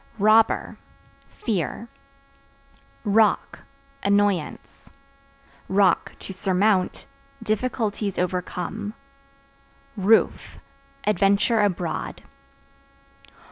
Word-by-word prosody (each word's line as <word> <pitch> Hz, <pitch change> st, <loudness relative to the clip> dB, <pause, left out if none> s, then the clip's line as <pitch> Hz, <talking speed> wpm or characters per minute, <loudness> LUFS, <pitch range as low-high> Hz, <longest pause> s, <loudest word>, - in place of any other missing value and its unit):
Robber 215 Hz, +2 st, +3 dB, 0.5 s
Fear. 215 Hz, -, -3 dB, 1.2 s
Rock 215 Hz, 0 st, +2 dB, 0.4 s
Annoyance; 200 Hz, -5 st, -1 dB, 0.8 s
(to 195 Hz, 0 st, +1 dB
surmount) 190 Hz, 0 st, +1 dB, 0.4 s
difficulties 215 Hz, -2 st, -2 dB
overcome. 180 Hz, +4 st, -3 dB, 1.0 s
Roof 210 Hz, +2 st, +2 dB, 0.5 s
Adventure 210 Hz, +3 st, +3 dB
abroad. 180 Hz, -4 st, -2 dB
205 Hz, 50 wpm, -24 LUFS, 190-215 Hz, 1.2 s, Robber